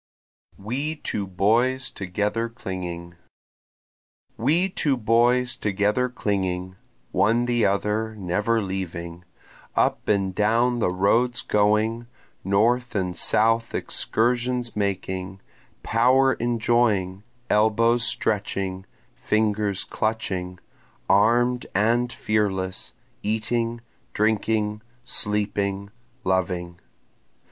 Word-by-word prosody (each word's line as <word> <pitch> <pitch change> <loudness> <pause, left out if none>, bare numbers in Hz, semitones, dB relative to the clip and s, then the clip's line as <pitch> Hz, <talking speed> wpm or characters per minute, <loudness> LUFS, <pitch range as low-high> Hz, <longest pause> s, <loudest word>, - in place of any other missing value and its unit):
We 135 +10 -3
Two 105 -9 -4
Boys 115 +8 +1
Together 105 +4 -2
Clinging 90 -6 -6 1.2
We 155 +11 +2
two 150 -7 0
boys 120 +2 +2
together 105 +5 0
clinging, 95 -5 -2 0.4
One 110 +6 +2
the 120 -2 +2
other 105 +3 -1
never 105 +4 0
leaving, 90 -2 -5 0.5
Up - - +1
and 100 -2 +1
down 115 +4 +2
the 105 - +2
roads 115 +7 +1
going, 110 +3 +1 0.4
North 115 +6 +1
and 90 -3 -1
South 115 +6 +2
excursions 120 +1 0
making, 95 -2 -3 0.4
Power 130 +4 +3
enjoying, 115 -5 +1 0.3
elbows 115 +2 +3
stretching, 100 -5 -1 0.3
fingers 105 -2 0
clutching, 95 -5 -3 0.5
Arm'd 120 +5 +3
and 120 +4 +2
fearless, 95 -5 -2 0.3
eating, 115 +2 -1 0.3
drinking, 105 0 0 0.2
sleeping, 100 -2 -1 0.3
loving. 90 -2 -1
105 Hz, 85 wpm, -24 LUFS, 95-120 Hz, 1.2 s, Power